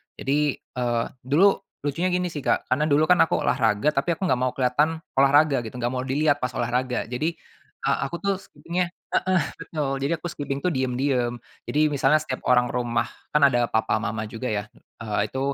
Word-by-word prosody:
Jadi, 145 +1 0
eee, 120 -2 -2 0.2
dulu 185 +10 +4 0.2
lucunya 145 +5 0
gini 180 -1 0
sih 150 - -5
Kak, - - +1
karena 150 +4 +2
dulu 150 +1 +4
kan 180 +2 +4
aku - - 0
olahraga 115 +3 +2
tapi 150 +5 0
aku 190 - -7
enggak 130 -7 +2
mau 130 0 +1
kelihatan 150 +5 +1 0.2
olahraga 140 0 +5
gitu, 110 - -10
enggak 120 +1 -1
mau 125 - -1
dilihat 145 +2 +2
pas 125 -1 -2
olahraga. 125 +1 -1
Jadi, 135 +6 -1 0.6
eee, - - +2
aku 155 - -6
tuh 200 - +2
skipping-nya 170 +2 -3 0.3
heeh 185 -2 +2 0.2
betul, 150 -4 -3
jadi 140 +4 +1
aku - - -13
skipping 140 -1 -4
tuh 180 - +2
diam-diam, 125 -1 0 0.3
jadi 150 +1 +3
misalnya 145 +2 +3
setiap 130 -4 -5
orang 125 -1 +5
rumah 120 -1 0 0.3
kan 150 - +5
ada 120 -3 +3
papa 110 0 +1
mama 110 +1 -2
juga 115 +4 -5
ya, 105 -1 -1 0.4
eee 105 -1 0
itu 130 - -4
135 Hz, 190 wpm, -24 LUFS, 125-155 Hz, 0.6 s, olahraga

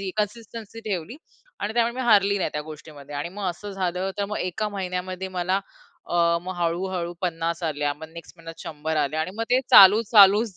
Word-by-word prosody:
ही 195 -1 -3
consistency 220 +1 -5
ठेवली 190 - -4 0.4
आणि 205 - -2
त्यामुळे 235 0 +1
मी 260 - -4
हारली 200 -2 +4
नाही - - -1
त्या 150 - -2
गोष्टीमध्ये. 150 -2 -11
आणि 145 +4 -3
मग 200 +2 -7
असं 205 +4 -9
झालं 185 0 -2
तर 200 - +1
मग 210 - -4
एका 195 +4 -2
महिन्यामध्ये 185 -1 -4
मला 185 +1 -1 0.5
अ, - - -5 0.3
मग 185 +1 -5
हळू-हळू 175 +1 -2
50 170 -1 -2
आल्या. 145 -2 -1
मग 160 +2 -11
नेक्स्ट 170 0 -11
महिन्यात 165 -1 -11
100 155 0 -4
आल्या 150 +1 0
आणि 160 - -2
मग 230 - -2
ते 255 +1 +4
चालू 200 +3 +9
चालूच 205 -1 +6
185 Hz, 195 wpm, -24 LUFS, 165-205 Hz, 0.5 s, चालू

